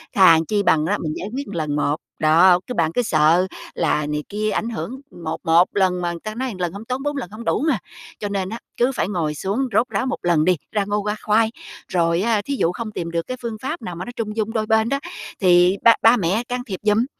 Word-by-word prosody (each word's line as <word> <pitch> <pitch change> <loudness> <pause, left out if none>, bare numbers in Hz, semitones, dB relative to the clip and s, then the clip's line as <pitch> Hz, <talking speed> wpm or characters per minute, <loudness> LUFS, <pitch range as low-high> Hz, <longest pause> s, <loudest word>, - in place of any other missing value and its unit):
Thà 185 -4 +7
chi 205 -1 +1
bằng 155 -5 +3
á, 205 +5 +1
mình 155 -1 -2
giải 195 - -5
quyết 280 +1 -4
lần 155 -6 -2
một. 145 0 +1 0.2
Đó, 170 +4 +5
cái 250 - -4
bạn 160 -1 +1
cứ 245 - +2
sợ 165 -2 +3 0.3
là 150 -2 +1
này 150 0 -2
kia 215 +1 -1
ảnh 230 - -1
hưởng 230 0 -4 0.3
một 160 0 -3
một 165 +2 +5
lần 185 -2 +2
mà 175 -1 -1
người 170 - -6
ta 215 0 -5
nói 260 +2 -2
một 195 -6 -8
lần 175 -1 -2
hông 205 +3 -8
tốn, 255 +3 -3
bốn 290 0 -2
lần 240 -10 -5
hông 225 +2 -9
đủ - - +1
mà, 265 - +2 0.4
cho 205 - -3
nên 195 -2 -2
á, 230 +3 -6 0.2
cứ 245 +2 +2
phải - - 0
ngồi 165 -6 -1
xuống 195 - -2
rốt 240 +5 +2
ráo 260 - -1
một 260 - -2
lần 170 -3 +3
đi 180 -1 +3
ra 205 -2 0
ngô 205 +1 -1
ra 210 - 0
khoai, 220 +1 +3 0.4
rồi 170 -1 +1
á, 220 0 +1
thí 280 - -2
dụ 165 - +2
không 220 +4 -5
tìm 170 -4 -5
được 165 0 -2
cái 255 - -4
phương 230 -2 -4
pháp 265 - -3
nào 180 -4 -5
mà 180 +2 -6
nó - - -7
trung 215 -2 -4
dung 220 0 -1
đôi 220 -2 0
bên 220 +1 +2
đó, 275 +1 0 0.4
thì 180 0 +5
ba 230 - +8
ba 230 +2 +7
mẹ 195 +4 0
can 250 0 -2
thiệp 190 -4 -5
giùm, 215 +2 +3
200 Hz, 265 wpm, -21 LUFS, 170-225 Hz, 0.4 s, ba